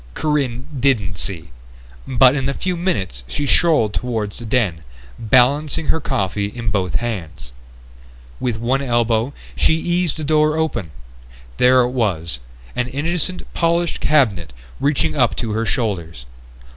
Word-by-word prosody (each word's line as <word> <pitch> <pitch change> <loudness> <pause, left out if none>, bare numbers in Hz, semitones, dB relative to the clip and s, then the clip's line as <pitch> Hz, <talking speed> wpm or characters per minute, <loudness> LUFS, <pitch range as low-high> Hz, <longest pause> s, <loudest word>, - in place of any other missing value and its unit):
Corinne 135 -5 -1
didn't 105 -10 +1
see, 80 -9 -4 0.6
but 130 +1 +5
in 135 -1 -1
a 140 - -2
few 185 -1 -2
minutes 100 - -2
she 145 - -2
strolled 145 - +3
toward 110 -5 -2
the 120 - -8
den, 105 -8 0 0.4
balancing 135 +7 +2
her 160 - +2
coffee 100 -7 -1
in 115 +1 -4
both 95 -4 -1
hands. 95 - -4 0.9
With 120 -3 -1
one 125 +4 0
elbow 120 -1 +1 0.2
she 160 - +3
eased 175 -1 0
the 155 - -4
door 155 +1 +2
open. 160 - -1 0.7
There 125 +1 +5
it 125 0 0
was: 85 - -1 0.4
an 125 -1 0
innocent 170 +7 -2
polished 170 0 +1
cabinet 100 - +2 0.3
reaching 130 - +1
up - - +2
to 115 - -3
her 110 +1 -1
shoulders. 85 - -2
125 Hz, 140 wpm, -20 LUFS, 105-145 Hz, 0.9 s, but